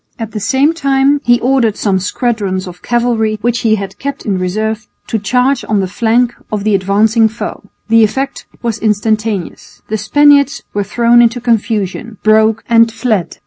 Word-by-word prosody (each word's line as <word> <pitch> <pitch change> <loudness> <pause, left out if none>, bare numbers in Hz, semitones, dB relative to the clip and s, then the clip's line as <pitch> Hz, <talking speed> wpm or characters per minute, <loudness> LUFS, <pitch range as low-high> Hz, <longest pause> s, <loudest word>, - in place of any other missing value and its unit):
At 225 -2 -6
the 215 - -4
same 265 +9 +1
time 275 -2 +1
he 240 0 +3
ordered 245 -4 +1
some 195 -3 0
squadrons 200 -2 -2
of 180 -1 -11
cavalry 235 -3 0
which 240 +1 0
he 220 -1 +2
had 195 -2 -7
kept 280 0 -5
in 195 -3 -1
reserve 215 +4 -2 0.2
to 225 - -2
charge 250 +6 +1
on 210 -2 +2
the 195 - 0
flank 235 +5 +1 0.2
of 210 -2 -2
the 215 0 +1
advancing 210 +4 +2
foe. 220 +1 -6 0.3
The 225 0 +4
effect 270 +6 -2 0.2
was 230 -2 -2
instantaneous. 215 -2 -2
The 220 0 -2
Spaniards 290 +5 +3
were 205 - -1
thrown 235 +4 +3
into 235 +1 +2
confusion, 225 -2 -2
broke 220 +1 +3
and 230 -1 +4
fled. 225 -5 -2
225 Hz, 170 wpm, -13 LUFS, 210-240 Hz, 0.3 s, The